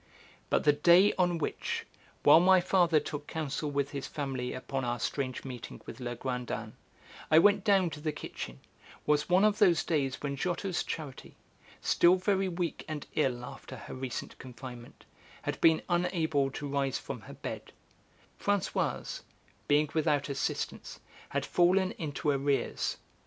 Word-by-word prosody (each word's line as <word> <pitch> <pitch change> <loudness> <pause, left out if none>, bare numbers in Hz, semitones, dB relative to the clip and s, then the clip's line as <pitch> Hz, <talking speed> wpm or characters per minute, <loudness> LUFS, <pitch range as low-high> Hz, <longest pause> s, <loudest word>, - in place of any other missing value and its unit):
But - - +2
the 150 - +5
day 175 +7 +6
on 175 -1 +3
which, 160 - -3 0.4
while - - +8
my 185 +2 +6
father 175 -3 +3
took 150 0 -6
counsel 155 -1 -3
with 140 -1 -1
his 140 -2 -4
family 135 -4 -3
upon 135 +1 -4
our 120 -1 -1
strange 130 +1 -3
meeting 125 -3 -7
with - - -9
Legrandin, 120 -2 -4 0.6
I 155 - +6
went 200 +4 +5
down 195 -5 +3
to 150 - -7
the 155 0 -1
kitchen, 65 - -7 0.4
was 150 +2 +2
one 185 +3 +5
of 210 0 +2
those 180 -6 +5
days 140 -5 0
when 140 -1 -2
Giotto's 180 +4 -1
Charity, 145 -5 -6 0.5
still 175 +1 +5
very 190 0 +1
weak 175 -1 -3
and 155 -2 -5
ill 125 -5 0
after - - -9
her - - -9
recent 130 -1 -5
confinement, 125 -1 -10 0.4
had - - -3
been 160 -1 +5
unable 165 -5 +1
to 145 +2 -6
rise 140 -1 0
from - - -7
her - - -11
bed; - - -7 0.7
Françoise, 190 -7 -1 0.5
being 150 +1 +4
without 150 -3 +1
assistance, 140 - -3 0.3
had - - -1
fallen 185 +2 +3
into 150 -1 -1
arrears. 140 0 0
150 Hz, 150 wpm, -30 LUFS, 135-175 Hz, 0.7 s, while